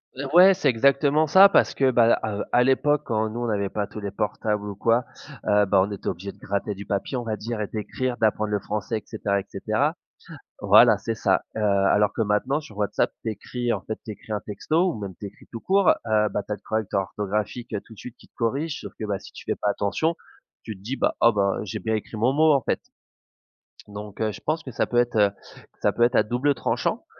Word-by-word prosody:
Eh 135 +2 -5
ouais 185 +3 +8
c'est 180 -6 +1
exactement 140 +5 +3
ça 190 +6 +8
parce - - +3
que 135 -1 +3
bah 120 -2 +4
heu, - - +6
à, 105 -2 -3
heu, - - -1
à 125 - +4
l'époque 145 +3 +2
quand 110 -2 0
nous 115 +3 -5
on 120 - -1
n'avait 100 -3 -1
pas 105 +1 -2
tous - - -8
les 100 -1 -4
portables 105 0 -2
ou 100 - -6
quoi, 115 +4 +2 0.4
heu, 105 -1 +4
bah 95 -1 +3
on 105 - -7
était 100 - -7
obligés 95 +3 -4
de - - -22
gratter 100 +1 -2
du 100 +1 -9
papier 100 +6 -2
on 120 - -3
va 110 -2 -2
dire 110 +1 -5
et 105 - -2
d'écrire 120 +4 -3
d'apprendre 110 -1 +1
le 105 - +1
français 105 +3 -3
et 105 - -8
cetera, 100 0 -1
et 95 - -7
cetera. - - -1 0.7
Voilà - - +6
c'est 115 - -4
ça. 95 -3 +1
Heu, 110 - -2
alors 100 +1 +3
que - - -2
maintenant 110 +7 +1
sur 110 -9 -13
WhatsApp 105 -2 0
tu - - -2
écris 120 +3 -4
en - - -3
fait, 110 - -5
tu 110 - -5
écris 105 +1 -8
un 105 - -1
texto 160 - 0
ou 110 - -7
même 100 -2 -6
tu 100 - -5
écris - - -16
tout 115 - -6
court, 195 0 +3 0.2
heu, 105 -1 +2
bah 105 - -2
tu 105 - -10
as - - 0
le - - -19
correcteur 110 -3 -1
orthographique, 105 +4 -4
heu, 105 - -1
tout 115 - -14
de - - -15
suite 125 -1 -9
qui - - -19
te - - -54
corrige, 140 +7 -2
sauf - - -8
que 110 - -3
bah 100 -2 -2
si - - -13
tu - - -11
fais - - -1
pas 105 - -1
attention, 130 +12 0 0.5
tu 110 - -6
te 95 - -19
dis: 120 +6 -4
«Bah, - - +1
ah 115 - +6
bah 100 -2 +1
j'ai 100 - -5
bien 110 -1 -1
écrit 110 +1 -5
mon 120 +5 +2
mot, 155 +1 +5
en 140 - +2
fait.» - - -1 1.1
Donc 105 0 -9
heu, 110 -1 +1
je - - -11
pense 155 +2 -2
que 130 - -8
ça - - 0
peut 120 - -1
être, 120 -1 +2
heu, 100 -1 +4 0.5
ça - - +3
peut 120 - +1
être 120 - +3
à - - +5
double 125 +6 0
tranchant, - - -2
110 Hz, 260 wpm, -24 LUFS, 105-125 Hz, 1.1 s, ouais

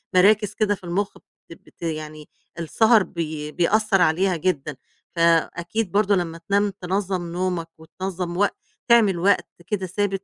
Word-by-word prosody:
مراكِز 205 +2 +4
كده 210 -1 +1
في 190 - -22
المُخ 195 +4 -2 0.3
بتب 165 - -14
ت - - -34
يعني 155 -2 -5 0.3
السَهَر 220 +5 +4
بي 155 -4 -5
بيأثّر 195 +4 +2
عليها 180 +3 +2
جدًا، 155 -4 -2 0.4
فأكيد 170 +4 +1
برضه 205 0 +3
لمّا 170 -3 -2
تنام 205 +1 +3
تنظّم 185 -2 -2
نومك 180 -2 -2
وتنظّم 175 +1 -5
وق 205 +2 +3 0.4
تعمل 220 -7 +4
وقت 195 +4 +2 0.2
كده 195 -3 -2
ثابت 195 +1 -2
185 Hz, 140 wpm, -23 LUFS, 170-205 Hz, 0.4 s, مراكِز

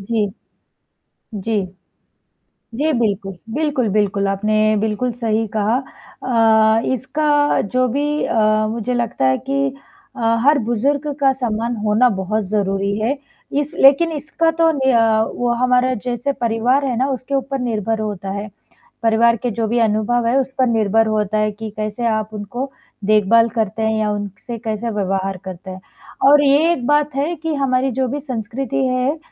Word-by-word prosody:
जी। 210 0 -1 1.1
जी। 205 -1 -1 1.1
जी, 310 +1 +1
बिल्कुल, 200 -5 -1 0.2
बिल्कुल, 290 -6 0
बिल्कुल, 200 -1 +1
आपने 215 +2 +1
बिल्कुल 220 +4 -1
सही 225 0 0
कहा 215 +3 +2 0.5
अ, 225 -2 +4
इसका 290 +3 +1
जो 255 +5 0
भी 295 +4 -1
अ, 215 -1 +2
मुझे 235 +2 -2
लगता 235 - -1
है 130 0 +2
कि 275 0 +1 0.5
अ, - - -7 0.2
हर 290 +1 +5
बुज़ुर्ग 275 +6 0
का 270 -1 +4
सम्मान 235 -2 -2
होना 215 +4 +4
बहुत 215 +3 -1
ज़रूरी 200 -1 0
है, 240 +7 0 0.4
इस 290 +2 -1
लेकिन 290 +5 +5
इसका 315 +2 0
तो 325 0 +2
नि 265 -3 +1
अ, 225 -2 +3
वो 245 0 -1
हमारा 255 0 +3
जैसे 245 +3 -1
परिवार 240 +4 +1
है 250 -3 -1
ना 265 - +1
उसके 260 +2 -4
ऊपर 275 0 -1
निर्भर 225 -2 -1
होता 200 -3 -4
है, 200 +1 -5 0.5
परिवार 230 +1 +4
के 245 +2 -3
जो 225 0 -2
भी 240 - +1
अनुभव 225 +2 +1
है 240 - +2
उस 265 - -3
पर 255 - +4
निर्भर 225 -1 +2
होता 215 -1 0
है 215 0 +1
कि 220 +1 -7
कैसे 215 +2 -3
आप 215 -1 -2
उनको 240 +6 -5 0.3
देखभाल 215 +2 +4
करते 220 -1 -1
हैं 220 0 +1
या 210 -1 0
उनसे 205 +3 -6
कैसे 225 0 -3
व्यवहार 195 -2 -2
करते 190 0 -8
हैं? 185 0 -8 0.5
और 290 +1 +6
ये 290 +5 +4
एक 255 -8 -3
बात 295 0 +2
है 300 +5 0
कि 320 0 -3
हमारी 265 -1 +1
जो 260 +2 0
भी 285 +4 -3
संस्कृति 265 +1 -3
है, 255 +4 0
230 Hz, 165 wpm, -19 LUFS, 215-265 Hz, 1.1 s, और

